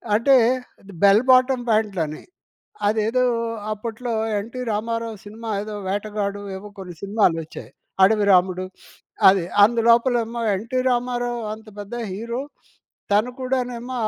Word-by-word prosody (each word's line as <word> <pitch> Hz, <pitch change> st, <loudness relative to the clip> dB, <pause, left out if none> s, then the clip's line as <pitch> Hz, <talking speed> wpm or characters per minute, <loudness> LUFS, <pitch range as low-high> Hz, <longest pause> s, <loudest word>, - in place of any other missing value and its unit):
అంటే, 265 Hz, +5 st, +4 dB, 0.5 s
అది 200 Hz, -, -14 dB
bell 200 Hz, +4 st, +6 dB
bottom 255 Hz, -1 st, +4 dB
ప్యాంట్లని. 195 Hz, -8 st, 0 dB, 0.7 s
అదేదో 220 Hz, +4 st, +1 dB, 0.5 s
అప్పట్లో 230 Hz, +3 st, -5 dB, 0.3 s
'ఎన్టీ 235 Hz, +5 st, -6 dB
రామారావు' 230 Hz, 0 st, -3 dB
సినిమా 220 Hz, +2 st, -8 dB
ఏదో 215 Hz, 0 st, -7 dB
'వేటగాడు' 205 Hz, 0 st, -3 dB
ఏవో 205 Hz, +2 st, -9 dB
కొన్ని 180 Hz, -2 st, -8 dB
సినిమాలొచ్చాయి. 180 Hz, -6 st, -1 dB, 0.3 s
'అడవిరాముడు'. 190 Hz, -3 st, +3 dB, 0.6 s
అది. 190 Hz, -3 st, +1 dB, 0.2 s
అందులోపలేమో 235 Hz, +1 st, +2 dB
'ఎన్టీ 230 Hz, +6 st, -3 dB
రామారావు' 245 Hz, -1 st, -1 dB
అంత 220 Hz, 0 st, -15 dB
పెద్ద 205 Hz, +3 st, -8 dB, 0.2 s
హీరో. 235 Hz, +6 st, -4 dB, 0.7 s
తను 215 Hz, +5 st, +3 dB
కూడానేమో 255 Hz, -1 st, -3 dB
220 Hz, 105 wpm, -22 LUFS, 200-240 Hz, 0.7 s, bell